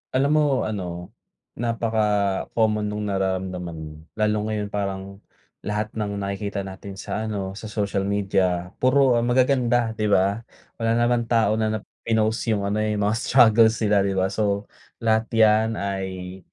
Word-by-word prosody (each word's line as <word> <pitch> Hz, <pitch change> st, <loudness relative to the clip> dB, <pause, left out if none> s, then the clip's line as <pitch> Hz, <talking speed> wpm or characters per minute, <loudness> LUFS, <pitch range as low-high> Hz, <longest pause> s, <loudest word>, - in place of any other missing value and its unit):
Alam 140 Hz, +3 st, +3 dB
mo -, -, +4 dB, 0.2 s
ano, 90 Hz, -3 st, -5 dB, 0.5 s
napaka-common 110 Hz, -2 st, 0 dB
nung 105 Hz, 0 st, -3 dB
nararamdaman 95 Hz, -3 st, -2 dB
mo. 75 Hz, -1 st, -7 dB, 0.2 s
Lalo 105 Hz, 0 st, +1 dB
ngayon 105 Hz, -2 st, -3 dB
parang 100 Hz, -1 st, -4 dB, 0.4 s
lahat 105 Hz, +1 st, -3 dB
ng 105 Hz, -1 st, -2 dB
nakikita 100 Hz, 0 st, -3 dB
natin 95 Hz, +1 st, -8 dB
sa 110 Hz, +3 st, -4 dB
ano, 100 Hz, -3 st, -3 dB
sa 110 Hz, -, -7 dB
social 100 Hz, -2 st, -2 dB
media, 95 Hz, -3 st, 0 dB
puro 130 Hz, -2 st, +4 dB
magaganda, 120 Hz, -1 st, +2 dB
di 110 Hz, -1 st, -2 dB
ba? 100 Hz, +1 st, +2 dB, 0.4 s
Wala 115 Hz, 0 st, +1 dB
naman 120 Hz, 0 st, +1 dB
tao 110 Hz, -2 st, +2 dB
na 110 Hz, -, +1 dB
na -, -, -3 dB, 0.3 s
pinost 110 Hz, 0 st, +1 dB
yung 105 Hz, -3 st, +1 dB
ano, 100 Hz, +2 st, -1 dB
eh, 110 Hz, 0 st, 0 dB
mga 105 Hz, +1 st, +1 dB
struggles 115 Hz, -3 st, +5 dB
nila, 105 Hz, -1 st, +3 dB
di 100 Hz, 0 st, 0 dB
ba? 95 Hz, 0 st, +1 dB
So 100 Hz, -1 st, -1 dB, 0.3 s
lahat 110 Hz, 0 st, +2 dB
'yan 110 Hz, 0 st, +4 dB
ay 95 Hz, -1 st, -4 dB
105 Hz, 150 wpm, -23 LUFS, 100-110 Hz, 0.5 s, struggles